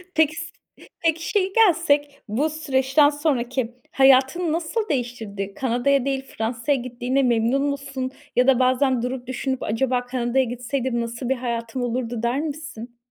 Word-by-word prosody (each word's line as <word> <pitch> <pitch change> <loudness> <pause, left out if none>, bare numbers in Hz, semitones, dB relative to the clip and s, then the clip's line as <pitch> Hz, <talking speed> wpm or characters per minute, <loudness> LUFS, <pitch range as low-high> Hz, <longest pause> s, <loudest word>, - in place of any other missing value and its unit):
Peki, 310 -1 +4
s 320 0 -6 0.5
peki, 325 -1 0
şeye 390 -3 +2
gelsek, 335 -9 +2
bu 260 +9 0
süreçten 290 -1 +3
sonraki 260 -5 -1 0.2
hayatını 270 +5 +4
nasıl 350 +7 -2
değiştirdi? 225 -7 -3
Kanada'ya 260 +1 +1
değil, 270 -1 -1
Fransa'ya 230 +5 0
gittiğine 255 +2 -1
memnun 240 +2 +2
musun? 275 -2 -3 0.2
Ya 250 +1 +4
da 260 -2 +5
bazen 255 0 +2
durup 250 0 -4
düşünüp, 260 0 -2
acaba 245 +3 0
Kanada'ya 250 +1 +1
gitseydim 245 0 -2
nasıl 235 +1 -4
bir 265 - +2
hayatım 235 0 -3
olurdu, 240 -1 -2
der 240 +3 +1
misin? 290 -6 -6
260 Hz, 140 wpm, -23 LUFS, 240-285 Hz, 0.5 s, da